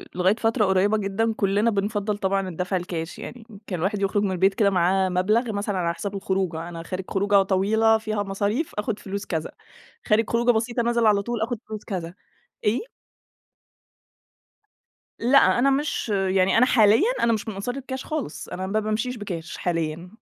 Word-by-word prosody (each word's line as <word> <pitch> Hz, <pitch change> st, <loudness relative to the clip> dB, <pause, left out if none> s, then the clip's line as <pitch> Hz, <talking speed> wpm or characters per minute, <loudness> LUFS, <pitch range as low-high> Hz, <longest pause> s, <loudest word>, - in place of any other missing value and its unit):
لغاية 185 Hz, +3 st, +3 dB
فترة 225 Hz, -1 st, +1 dB
قريبة 190 Hz, +3 st, +3 dB
جدًا، 210 Hz, +3 st, 0 dB
كلنا 205 Hz, +1 st, +1 dB
بنفضَّل 205 Hz, 0 st, -1 dB
طبعًا 195 Hz, -1 st, 0 dB
الدفع 180 Hz, +2 st, -3 dB
الكاش 170 Hz, -2 st, -5 dB
يعني، 245 Hz, -1 st, -8 dB
يمكن 205 Hz, -3 st, -7 dB
الواحد 195 Hz, +4 st, -1 dB
يخرج 200 Hz, +1 st, +1 dB
من 195 Hz, -, 0 dB
البيت 190 Hz, +2 st, +2 dB
كده 200 Hz, 0 st, +3 dB
معاه 190 Hz, +1 st, +2 dB
مبلغ 215 Hz, +6 st, +1 dB
مثلًا 200 Hz, -1 st, -2 dB
على 170 Hz, -2 st, 0 dB
حساب 200 Hz, +3 st, -5 dB
الخروجة، 190 Hz, -4 st, -2 dB
أنا 165 Hz, -1 st, -7 dB
خارج 185 Hz, +2 st, -5 dB
خروجة 200 Hz, 0 st, +3 dB
طويلة 220 Hz, +4 st, +3 dB
فيها 215 Hz, -2 st, -2 dB
مصاريف 205 Hz, +9 st, -2 dB
آخد 210 Hz, 0 st, -2 dB
فلوس 200 Hz, +1 st, -5 dB
كذا، 160 Hz, -2 st, -3 dB, 0.5 s
خارج 215 Hz, 0 st, +2 dB
خروجة 235 Hz, +1 st, +3 dB
بسيطة 235 Hz, +1 st, 0 dB
نازل 235 Hz, 0 st, +1 dB
على 205 Hz, -2 st, +4 dB
طول 235 Hz, +2 st, -3 dB
آخد 235 Hz, +2 st, -1 dB
فلوس 215 Hz, -1 st, -6 dB
كذا، 175 Hz, -4 st, -4 dB, 0.5 s
إيه؟ 210 Hz, +3 st, +2 dB, 2.4 s
لأ، 250 Hz, +1 st, +4 dB
أنا 270 Hz, +3 st, +4 dB
مش 275 Hz, -3 st, -1 dB
يعني 190 Hz, -1 st, +2 dB
أنا 250 Hz, -, +6 dB
حاليًا 230 Hz, -, +4 dB
أنا 230 Hz, -, +4 dB
مش 220 Hz, -, -3 dB
من 220 Hz, -, -3 dB
أنصار 200 Hz, +6 st, -4 dB
الكاش 265 Hz, -1 st, -6 dB
خالص، 305 Hz, -, -4 dB
أنا 185 Hz, +1 st, -4 dB
ما 210 Hz, +3 st, 0 dB
بامشيش 215 Hz, +4 st, -2 dB
بكاش 170 Hz, -6 st, -6 dB
حاليًا، 165 Hz, 0 st, -2 dB
205 Hz, 170 wpm, -24 LUFS, 190-225 Hz, 2.4 s, أنا